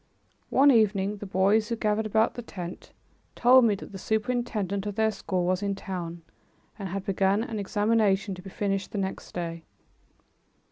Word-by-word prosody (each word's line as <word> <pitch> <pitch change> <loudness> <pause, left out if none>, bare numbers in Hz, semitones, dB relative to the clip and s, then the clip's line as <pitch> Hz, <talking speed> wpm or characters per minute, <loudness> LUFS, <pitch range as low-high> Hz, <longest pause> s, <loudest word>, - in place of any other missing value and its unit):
One 280 +2 +6
evening, 210 -3 +2
the 205 - -7
boys 200 +4 +2
who 230 - 0
gathered 215 -1 0
about 220 +2 +2
the 240 - -6
tent 180 -6 -8 0.4
told 250 +1 +6
me 215 -3 +3
that 200 - -10
the 195 - -8
superintendent 215 -3 -1
of 205 - -4
their 220 0 +2
school 185 -3 -2
was 185 +1 +1
in 200 -1 -1
town 175 -4 -6 0.6
and 195 -2 -4
had 195 +1 -4
begun 195 +2 +2
an 225 -3 -4
examination, 205 -1 +1
to 180 - -9
be 195 - -9
finished 195 +1 -2
the - - -3
next 190 -1 -4
day. 170 -1 -4
200 Hz, 175 wpm, -27 LUFS, 190-220 Hz, 0.6 s, One